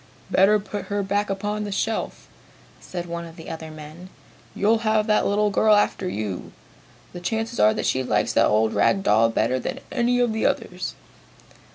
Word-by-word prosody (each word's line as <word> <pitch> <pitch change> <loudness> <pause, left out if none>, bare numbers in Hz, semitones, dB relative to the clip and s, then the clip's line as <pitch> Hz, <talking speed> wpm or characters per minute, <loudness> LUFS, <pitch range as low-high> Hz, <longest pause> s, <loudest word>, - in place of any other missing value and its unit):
"Better 195 +3 +5
put 205 0 -6
her 205 0 -2
back 205 +1 -1
upon 205 +2 -2
the 205 - -5
shelf," 215 +3 -3 0.5
said 175 -1 -6
one 170 0 -5
of 165 -1 -11
the 165 -1 -9
other 160 -1 -7
men. 155 +4 -11 0.5
"You'll 220 +3 +2
have 215 -1 +1
the 215 -1 +2
little 205 +1 +1
girl 215 +1 +4
after 195 -2 +1
you! 105 - -5 0.6
The 175 - -6
chances 225 +6 -3
are 105 +1 +5
that - - -2
she 130 - +1
likes - - 0
that - - +4
old 110 +1 +2
rag 195 0 +2
doll 115 - +4
better 115 +3 0
than - - -4
any 245 0 +1
of 240 -2 +2
the 220 - -2
others!" - - -2
195 Hz, 185 wpm, -23 LUFS, 160-210 Hz, 0.6 s, Better